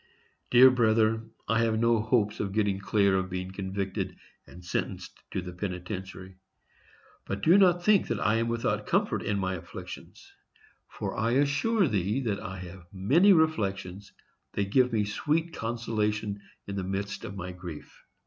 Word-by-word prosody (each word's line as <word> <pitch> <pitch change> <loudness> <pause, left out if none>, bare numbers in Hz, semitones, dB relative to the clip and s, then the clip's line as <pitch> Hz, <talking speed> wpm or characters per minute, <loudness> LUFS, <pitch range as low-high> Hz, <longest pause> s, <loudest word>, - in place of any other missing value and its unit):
Dear 130 +1 +8
brother, 110 -2 +3 0.3
I 115 +2 +2
have 115 -1 +2
no 115 -1 +3
hopes 110 -2 +1
of 100 -2 -2
getting 100 -2 +1
clear 100 -1 +2
of 95 0 -1
being 90 0 -4
convicted 95 0 -3 0.3
and 90 0 -13
sentenced - - -4
to 95 - -3
the 90 0 -7
penitentiary; 95 0 -6 0.9
but 100 0 -4
do 170 - +6
not 180 -3 +5
think 210 -3 +4
that 115 - -2
I 110 +3 +2
am 115 0 0
without 115 0 -1
comfort - - +1
in 105 - -1
my 95 -1 -1
afflictions, 85 -1 -9 0.6
for - - -5
I 115 +2 0
assure 145 - +2
thee 105 +1 0
that 105 -5 -1
I 95 -3 -6
have 90 0 -10
many 140 - +4
reflections 100 - 0 0.4
that 100 -1 -2
give 125 0 +4
me 110 -2 +1
sweet 155 +10 -1
consolation 110 -3 -2 0.2
in 100 0 -5
the 95 - -2
midst 100 +2 -4
of 100 - -7
my 90 -1 -5
grief. 90 -3 -10
105 Hz, 160 wpm, -28 LUFS, 95-115 Hz, 0.9 s, Dear